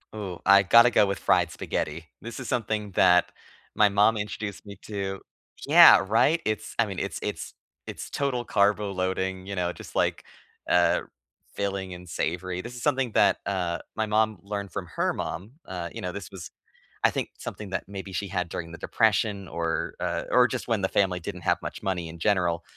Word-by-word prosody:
Ooh, 95 -5 -5
I 100 0 +7
gotta 115 +6 +7
go 110 - +4
with 100 -2 -2
fried 85 0 +2
spaghetti. 80 +2 -4
This 115 +3 -7
is 130 - -6
something 110 -4 -2
that 90 0 +4 0.4
my 105 -1 +5
mom 105 +3 +3
introduced 105 -1 -5
me 100 -1 -10
to. 95 -2 -4 0.5
Yeah. - - +9
Right? 145 - +3
It's 110 0 -3
I 115 - +5
mean, 95 -3 -5
it's - - -3
it's - - -5 0.3
it's - - -7
total 125 -4 -1
carbo 100 0 +2
loading, 95 0 -2
you 100 0 -5
know, 90 -1 0
just - - -12
like, - - 0 0.4
uh, 90 0 +4 0.5
filling 95 -2 -3
and 90 0 -10
savory. 90 +2 -3
This 120 +4 -9
is 120 - -8
something 130 -3 +1
that, - - +4
uh, 90 -3 -1 0.2
my 110 - 0
mom 110 0 +1
learned 100 -1 -5
from 95 -3 -4
her - - +1
mom, 95 +8 -5
uh, 90 -2 -5
you - - -6
know, 90 - -3
this 100 +2 -7
was, 95 -4 -9 0.5
I - - +6
think, - - -3
something 105 -2 -7
that 95 - -2
maybe 100 -1 -7
she 100 - -2
had 90 -2 -1
during 85 0 -5
the 85 - -8
depression 105 -2 +1
or, 85 -1 -2
uh, - - -2
or 125 -1 +6
just - - -4
when 110 -4 +1
the 95 - +1
family 95 -3 +1
didn't 80 - -7
have - - +2
much - - -7
money 90 -3 -2
in 80 +1 -9
general, 85 -3 +1
100 Hz, 195 wpm, -26 LUFS, 90-105 Hz, 0.5 s, Yeah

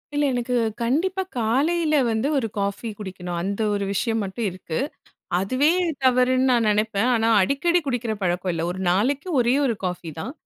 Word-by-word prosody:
இல்ல. 290 0 +2
எனக்கு 245 0 -1 0.3
கண்டிப்பா 335 +11 0 0.2
காலையில 305 +8 +1
வந்து 225 +4 0
ஒரு 245 -4 0
காஃபி 200 +3 -2
குடிக்கணும். 180 -3 -6
அந்த 200 +4 -2
ஒரு 200 -1 -1
விஷயம் 225 +2 0
மட்டும் 195 +4 -4
இருக்கு. 175 -3 -6 0.6
அதுவே 255 +10 +2 0.4
தவறுன்னு 255 0 +3
நான் 235 -2 +2
நினைப்பேன். 215 +1 +1
ஆனா 225 -1 +2
அடிக்கடி 340 - +2
குடிக்கிற 245 -4 -1
பழக்கம் 180 0 0
இல்ல. 165 -1 -2
1 185 +1 -5
நாளைக்கு 265 - 0
ஒரே 240 +1 +3
1 245 -4 +1
காஃபி 180 -2 -3
தான். 255 - -5
230 Hz, 160 wpm, -23 LUFS, 195-260 Hz, 0.6 s, தவறுன்னு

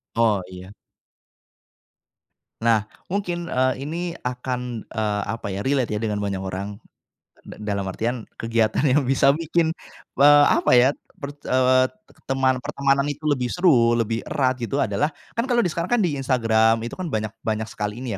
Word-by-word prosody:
Oh 110 -4 +3
iya. 95 +1 -10 1.9
Nah, 115 -2 +3 0.2
mungkin, 175 -3 -3
eee, 130 0 +2
ini 170 +3 -4
akan, 125 -2 -4
eee, 105 -2 -2
apa 115 -3 -4
ya, 100 +4 -4
relate 130 -6 0
ya - - -3
dengan 105 -2 -2
banyak 100 -2 -2
orang, 95 +2 -5 0.6
d - - -12
dalam 100 -2 -2
artian 115 +4 -3
kegiatan 115 +4 +1
yang 140 +2 +4
bisa 135 +1 +4
bikin, 165 +1 0 0.5
eee, 145 0 +8
apa - - +2
ya 125 +2 +6 0.3
per 140 0 -7 0.2
eee, 130 0 +4 0.4
teman 130 -1 +1
pertemanan 140 0 0
itu 145 +1 -5
lebih 140 -5 +1
seru 120 -8 +3
lebih 115 -1 0
erat 130 -2 0
gitu 135 +4 0
adalah, 150 - 0 0.2
kan 230 +2 -2
kalau 240 -3 +2
sekarang 170 0 -2
kan 225 - +2
di 150 -6 -1
Instagram 115 -4 +3
itu 120 - -5
kan 180 - -3
banyak 110 -6 -2
banyak 110 0 -2
sekali 105 +4 -4
ini 125 - -4
125 Hz, 160 wpm, -23 LUFS, 110-145 Hz, 1.9 s, eee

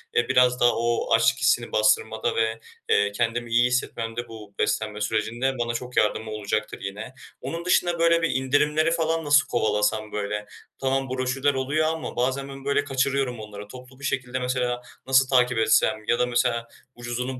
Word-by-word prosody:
eee, 120 - +2
biraz 125 -1 +4
daha 120 - +5
o 115 +1 0
açlık - - +3
hissini - - +2
bastırmada 110 +1 +1
ve, 110 0 0 0.3
eee, 100 0 +3
kendimi 115 +2 -2
iyi 120 +1 +4
hissetmemde 120 -1 -2
bu 105 -3 -11
beslenme 105 0 -1
sürecinde 120 +5 -1
bana 120 0 -1
çok 125 +1 -6
yardımı 110 +1 +1
olacaktır 110 0 -3
yine. 105 +5 -6 0.3
Onun 165 +6 -5
dışında, 175 -1 +2
böyle, 170 0 +4
bir 165 - +1
indirimleri 150 +4 +2
falan 165 -1 0
nasıl 145 +1 +4
kovalasam, 105 -1 0
böyle? 105 0 -3 0.3
Tamam, 135 0 -1
broşürler 130 +2 0
oluyor 145 +4 0
ama 160 0 -4
bazen 130 +3 -1
ben, 135 0 -10
böyle, 140 0 +1
kaçırıyorum 135 -2 -1
onları. 105 -1 -9
Toplu 125 +3 -13
bir 145 - -7
şekilde 130 -2 -2
mesela 125 -1 -1 0.3
nasıl 135 0 +4
takip 125 -2 +3
etsem 110 -1 +2
ya 120 - +2
da 125 - +3
mesela 120 -1 0 0.3
ucuzunu 125 +2 -4
125 Hz, 170 wpm, -24 LUFS, 110-135 Hz, 0.3 s, daha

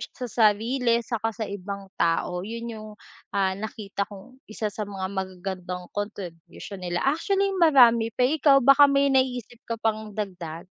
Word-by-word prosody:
sa 255 - -7
sarili 230 +2 +2
saka 225 -1 -2
sa 225 - -2
ibang 200 -1 -6
tao. 170 +1 +1
'Yon, 230 +4 -6
'yong, 215 -1 -9 0.5
ah, 190 -1 +2
nakita 200 0 -5
kong 215 +6 -13
1 215 -1 -4
sa 210 -1 -5
mga 190 -2 -4
magagandang 185 -1 -5
contribution 195 -1 -7
nila. 175 -1 -2
Actually, 390 +7 +1
marami 240 -8 +6
pa, 250 - +1
eh, 295 +5 +1
ikaw 275 0 +6
baka 275 +2 +7
may 280 0 +3
naiisip 250 -3 0
ka 230 - -2
pang 215 -2 -2
dagdag? 175 -6 -5
215 Hz, 155 wpm, -25 LUFS, 195-245 Hz, 0.5 s, baka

